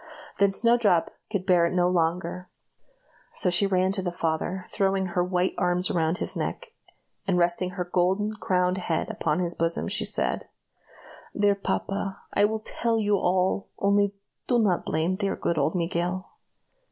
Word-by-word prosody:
Then 200 Hz, -1 st, +4 dB
Snowdrop 220 Hz, -5 st, +3 dB, 0.2 s
could 195 Hz, -4 st, -2 dB
bear 175 Hz, -3 st, +4 dB
it 175 Hz, -, -4 dB
no 175 Hz, -1 st, +3 dB
longer, 180 Hz, +1 st, -1 dB, 0.8 s
so 180 Hz, -, +2 dB
she 190 Hz, +3 st, +3 dB
ran 185 Hz, -1 st, +2 dB
to 195 Hz, -1 st, -2 dB
the 180 Hz, -1 st, -2 dB
father 175 Hz, +2 st, -2 dB
throwing 195 Hz, -1 st, 0 dB
her 180 Hz, -, +2 dB
white 180 Hz, 0 st, 0 dB
arms 180 Hz, +1 st, +1 dB
around 165 Hz, 0 st, +1 dB
his -, -, 0 dB
neck, -, -, -4 dB, 0.6 s
and 185 Hz, -2 st, +2 dB
resting 175 Hz, +1 st, +1 dB
her 180 Hz, -, -1 dB
golden 190 Hz, +4 st, +1 dB
crowned 180 Hz, -3 st, 0 dB
head 165 Hz, -3 st, -2 dB
upon 150 Hz, -, -1 dB
his 175 Hz, -1 st, 0 dB
bosom, 165 Hz, 0 st, -1 dB
she -, -, -1 dB
said: -, -, 0 dB, 0.9 s
"Dear 205 Hz, 0 st, +4 dB
papa, 195 Hz, 0 st, -3 dB, 0.2 s
I 205 Hz, -, +4 dB
will 220 Hz, +1 st, 0 dB
tell 225 Hz, +1 st, -1 dB
you 205 Hz, -1 st, +2 dB
all! 185 Hz, +2 st, 0 dB
Only 200 Hz, 0 st, +2 dB, 0.3 s
do 245 Hz, -, +3 dB
not 200 Hz, -6 st, +1 dB
blame 165 Hz, +4 st, 0 dB
dear, 200 Hz, -1 st, -1 dB
good 170 Hz, -2 st, -1 dB
old 150 Hz, +5 st, +1 dB
Miguel." 175 Hz, +1 st, -2 dB
185 Hz, 165 wpm, -26 LUFS, 175-200 Hz, 0.9 s, Then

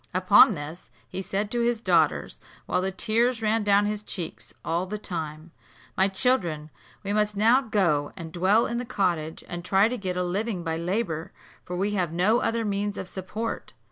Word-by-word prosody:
Upon 190 Hz, +4 st, +7 dB
this, 155 Hz, +3 st, -8 dB, 0.2 s
he 185 Hz, -, -5 dB
said 205 Hz, +2 st, -3 dB
to 240 Hz, -, +1 dB
his 235 Hz, -1 st, +1 dB
daughters, 230 Hz, -, +1 dB, 0.3 s
while 180 Hz, -, 0 dB
the 190 Hz, -, 0 dB
tears 225 Hz, +4 st, +1 dB
ran 220 Hz, +1 st, +2 dB
down 205 Hz, 0 st, +4 dB
his 210 Hz, 0 st, -2 dB
cheeks 170 Hz, -, -6 dB
all 170 Hz, +3 st, -1 dB
the 210 Hz, +3 st, -4 dB
time, 160 Hz, -4 st, -5 dB, 0.4 s
"My 190 Hz, -, +3 dB
children, 185 Hz, -, 0 dB, 0.3 s
we 200 Hz, +1 st, -2 dB
must 210 Hz, -1 st, +1 dB
now 230 Hz, +6 st, +5 dB
go 175 Hz, -, +1 dB
and 165 Hz, -2 st, -7 dB
dwell 190 Hz, +6 st, +3 dB
in 235 Hz, 0 st, -2 dB
the -, -, -3 dB
cottage, 175 Hz, -9 st, -1 dB
and 175 Hz, -1 st, -6 dB
try 195 Hz, +3 st, +4 dB
to 250 Hz, +2 st, -3 dB
get 185 Hz, -2 st, -3 dB
a 180 Hz, -, +1 dB
living 190 Hz, +1 st, -2 dB
by 165 Hz, -1 st, -2 dB
labour, 170 Hz, -1 st, -2 dB, 0.3 s
for 180 Hz, -, -6 dB
we 200 Hz, +3 st, 0 dB
have 180 Hz, -5 st, -1 dB
no 190 Hz, +8 st, +3 dB
other 230 Hz, 0 st, 0 dB
means 205 Hz, 0 st, -2 dB
of -, -, -5 dB
support." 205 Hz, +5 st, -5 dB
195 Hz, 190 wpm, -26 LUFS, 175-215 Hz, 0.4 s, Upon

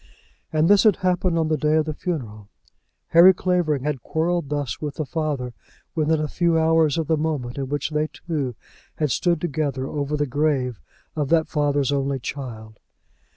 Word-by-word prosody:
And 155 Hz, +1 st, +2 dB
this 205 Hz, +1 st, +6 dB
had 215 Hz, -4 st, +5 dB
happened 180 Hz, -1 st, 0 dB
on 160 Hz, -1 st, +1 dB
the 155 Hz, 0 st, +1 dB
day 150 Hz, +2 st, +2 dB
of 155 Hz, -1 st, +2 dB
the 155 Hz, -, -3 dB
funeral! 115 Hz, -, -5 dB, 0.6 s
Harry 175 Hz, +3 st, +8 dB
Clavering 175 Hz, -7 st, 0 dB
had 145 Hz, -4 st, -2 dB
quarrelled 165 Hz, +2 st, -1 dB
thus 145 Hz, -4 st, -3 dB
with 150 Hz, -2 st, -4 dB
the 155 Hz, -, -3 dB
father 145 Hz, -5 st, -3 dB, 0.4 s
within 160 Hz, -1 st, +1 dB
a 155 Hz, -, -1 dB
few 170 Hz, +1 st, +1 dB
hours 160 Hz, -1 st, +3 dB
of 165 Hz, -, 0 dB
the 160 Hz, +2 st, +2 dB
moment 145 Hz, -5 st, -2 dB
in 135 Hz, -1 st, -3 dB
which 145 Hz, +2 st, -2 dB
they 150 Hz, 0 st, 0 dB
two 145 Hz, -8 st, -4 dB, 0.4 s
had 150 Hz, -4 st, 0 dB
stood 170 Hz, +3 st, +1 dB
together 145 Hz, -5 st, -2 dB
over 145 Hz, +1 st, -2 dB
the 145 Hz, -, +1 dB
grave 135 Hz, -3 st, 0 dB, 0.4 s
of 150 Hz, -3 st, -1 dB
that 165 Hz, -1 st, +3 dB
father's 145 Hz, -3 st, +1 dB
only 140 Hz, -1 st, 0 dB
child! 115 Hz, -5 st, -7 dB
150 Hz, 180 wpm, -23 LUFS, 140-160 Hz, 0.6 s, Harry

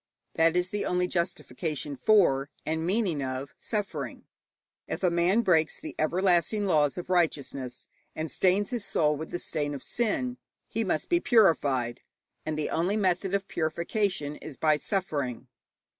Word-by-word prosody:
That 165 Hz, +1 st, +3 dB
is 180 Hz, 0 st, +1 dB
the 205 Hz, +1 st, -2 dB
only 180 Hz, 0 st, +1 dB
justification 170 Hz, -4 st, -3 dB
for, 140 Hz, -4 st, +4 dB, 0.2 s
and 160 Hz, +1 st, -1 dB
meaning 185 Hz, -7 st, +1 dB
of, 130 Hz, +1 st, -4 dB
suffering. 210 Hz, -3 st, -4 dB, 0.6 s
If -, -, -4 dB
a 180 Hz, -, +4 dB
man 175 Hz, +7 st, +3 dB
breaks 160 Hz, -5 st, +2 dB
the -, -, -7 dB
everlasting 180 Hz, +4 st, +2 dB
laws 150 Hz, -6 st, +2 dB
of 180 Hz, +1 st, -5 dB
righteousness 140 Hz, -7 st, 0 dB, 0.3 s
and 155 Hz, 0 st, -3 dB
stains 195 Hz, +2 st, +2 dB
his 240 Hz, -4 st, -2 dB
soul 150 Hz, -6 st, +1 dB
with 160 Hz, +2 st, -6 dB
the -, -, -3 dB
stain 145 Hz, -4 st, -3 dB
of 135 Hz, -, -7 dB
sin, 245 Hz, +2 st, -1 dB, 0.3 s
he 225 Hz, -, -1 dB
must 175 Hz, -6 st, -1 dB
be 345 Hz, -, +3 dB
purified, 140 Hz, -, +3 dB, 0.5 s
and 155 Hz, -1 st, -1 dB
the 155 Hz, -, -2 dB
only 180 Hz, +6 st, +1 dB
method 190 Hz, -1 st, +1 dB
of 195 Hz, -1 st, -2 dB
purification 170 Hz, -1 st, -1 dB
is 150 Hz, -4 st, -9 dB
by 155 Hz, -1 st, +3 dB
suffering. 145 Hz, -, -2 dB
170 Hz, 155 wpm, -28 LUFS, 150-195 Hz, 0.6 s, for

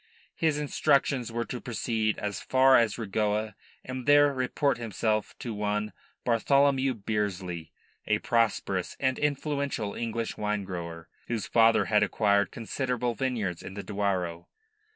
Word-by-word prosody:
His 160 Hz, -3 st, +1 dB
instructions 140 Hz, -4 st, +1 dB
were 115 Hz, +1 st, -2 dB
to 125 Hz, -, -6 dB
proceed 110 Hz, -2 st, -1 dB
as 105 Hz, -1 st, -3 dB
far 130 Hz, 0 st, +5 dB
as 115 Hz, -4 st, +3 dB
Regoa 105 Hz, 0 st, -1 dB, 0.3 s
and 130 Hz, 0 st, -6 dB
there 145 Hz, 0 st, +6 dB
report 130 Hz, +1 st, 0 dB
himself 110 Hz, -1 st, -1 dB
to 120 Hz, -, -5 dB
one 105 Hz, 0 st, -2 dB, 0.3 s
Bartholomew 135 Hz, +2 st, +3 dB
Bearsley, 95 Hz, -6 st, -3 dB, 0.4 s
a 105 Hz, -, +3 dB
prosperous 115 Hz, -6 st, 0 dB
and 130 Hz, -1 st, 0 dB
influential 140 Hz, -6 st, -1 dB
English 115 Hz, -1 st, -3 dB
wine 105 Hz, -1 st, -1 dB
grower, 85 Hz, -3 st, -6 dB, 0.2 s
whose 115 Hz, -4 st, -2 dB
father 115 Hz, 0 st, +4 dB
had 105 Hz, -1 st, +3 dB
acquired 100 Hz, -4 st, +2 dB
considerable 125 Hz, +1 st, -2 dB
vineyards 115 Hz, -9 st, -2 dB
in 95 Hz, -, -9 dB
the 100 Hz, -, -5 dB
Douro. 95 Hz, -5 st, -2 dB
115 Hz, 130 wpm, -28 LUFS, 105-130 Hz, 0.4 s, there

